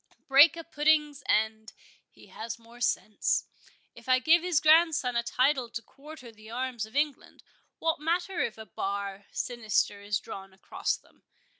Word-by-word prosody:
—Break 285 +4 +7
a 330 - -6
pudding's 300 -2 +1
end—he 220 0 -3
has 225 0 -6
more 235 +1 -17
sense. 215 -3 0 0.5
If - - -13
I 255 - +6
give 320 +6 +4
his 350 -3 +1
grandson 310 -5 +4
a 235 - +2
title 255 +1 +1
to 230 - -5
quarter 275 +1 -13
the 215 0 -15
arms 240 -2 -3
of 220 - -18
England, 290 -1 -2 0.3
what 325 -2 0
matter 345 +4 -1
if 225 - -1
a 220 - -9
bar 200 -1 -4
sinister 220 -4 -1
is 205 0 -1
drawn 195 0 -9
across 190 - -3
them? - - -27
250 Hz, 155 wpm, -28 LUFS, 220-305 Hz, 0.5 s, Break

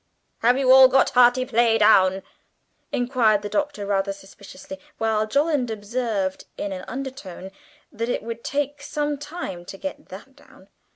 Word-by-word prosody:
('Have 245 +3 +3
you 265 -1 +3
all 265 0 +9
got 265 +1 +3
"hearty 250 +1 +4
play" 235 -2 +2
down?'" 195 -3 +4 0.7
inquired 240 -5 +1
the 205 - -4
Doctor 290 -7 -2
rather 200 0 0
suspiciously, 195 -1 -12 0.2
while 220 -1 0
Jolland 285 0 +1
observed 215 -3 -3
in 200 - -4
an 185 -1 -6
undertone 255 -9 -7 0.4
that 230 +2 -4
it - - -2
would 230 0 -7
take 285 0 -3
some 295 0 -3
time 290 - -7
to 195 - -9
get 285 +7 -7
that - - -12
down.) - - -20
230 Hz, 155 wpm, -23 LUFS, 200-265 Hz, 0.7 s, all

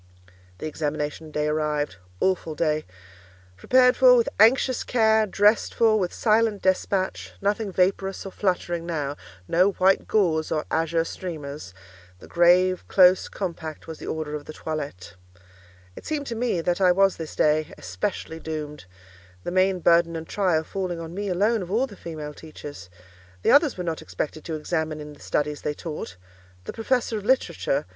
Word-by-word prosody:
The - - -7
examination 155 0 -3
day 150 0 -1
arrived. 150 - -1 0.2
Awful 180 -4 0
day! 155 -1 0 0.7
Prepared 250 - +4
for 255 -1 +7
with 235 -2 +3
anxious 250 +3 +4
care, 220 -2 +3
dressed 205 +2 +2
for 220 -2 +4
with 180 -3 -1
silent 220 -2 +1
despatch—nothing 195 +2 -1
vaporous 190 +1 0
or 195 - -6
fluttering 175 -3 -1
now—no 145 - -1
white 190 +1 +2
gauze 165 -7 +1
or 155 -1 -1
azure 165 0 +1
streamers; 150 - -7 0.4
the - - -14
grave, 180 +2 +3
close, 185 -1 +5
compact 165 -5 -5
was 160 -1 -8
the - - -8
order 155 -1 -3
of 150 -1 -5
the 155 - -8
toilette. 145 - -6 0.8
It - - -10
seemed 295 -2 -2
to 235 - -4
me 230 -7 0
that 175 +3 -1
I 185 -1 +6
was 195 +1 +3
this 160 -2 -7
day, 155 0 +2
especially 95 - -4
doomed—the 95 - -9
main 185 0 +2
burden 170 0 +4
and 160 0 -6
trial 180 -6 +1
falling 180 0 -4
on 165 0 -7
me 200 +2 -4
alone 205 +4 +1
of 180 - -6
all 230 +7 +2
the 210 - -12
female 155 -4 -7
teachers. 145 - -10 0.5
The - - +4
others 290 - +5
were 180 - -3
not 165 -2 -3
expected 145 +12 -5
to 160 - -3
examine 155 0 -2
in 150 0 -8
the 145 - -18
studies 150 0 -2
they 150 - -2
taught; 150 - -7 0.5
the - - -7
professor 225 -1 0
of - - -11
literature, 260 - +1
M. - - -2
170 Hz, 165 wpm, -25 LUFS, 150-195 Hz, 0.8 s, for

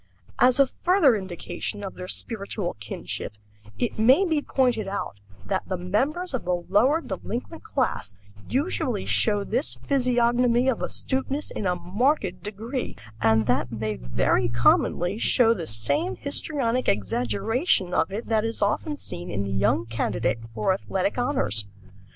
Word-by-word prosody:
As 250 +1 +5
a 275 - +7
further 320 - +3
indication 195 +2 -5
of 195 - -5
their 180 - -8
spiritual 200 -3 -2
kinship, 110 -1 -5 0.4
it 240 -2 -2
may 260 - +5
be 320 -4 +1
pointed 245 -7 +1
out 195 - -4 0.3
that 190 -2 -2
the 185 - -1
members 270 - -1
of 260 - -2
the 180 0 +1
lower 210 - +2
delinquent 240 - -5
class 240 - -2 0.3
usually 260 - -1
show 205 -2 +3
this 240 +8 +1
physiognomy 245 -2 +2
of 245 - -1
astuteness 270 +2 -1
in 200 - -3
a 180 - +1
marked 185 - 0
degree, 225 +5 -5 0.3
and 110 0 +3
that 125 +4 +1
they 110 -2 -3
very - - 0
commonly 175 - +2
show 230 -1 +5
the 170 -7 -5
same 115 +3 0
histrionic 260 - -1
exaggeration 125 - 0
of 160 - +1
it 215 +4 -4
that 220 -1 +1
is 225 0 -2
often 290 +9 -1
seen 175 -9 -7
in 100 -1 -2
the 100 - -4
young 100 +2 +2
candidate 115 +1 -1 0.2
for 110 - +2
athletic 195 +3 -2
honors. 110 - +1
205 Hz, 145 wpm, -25 LUFS, -, 0.4 s, a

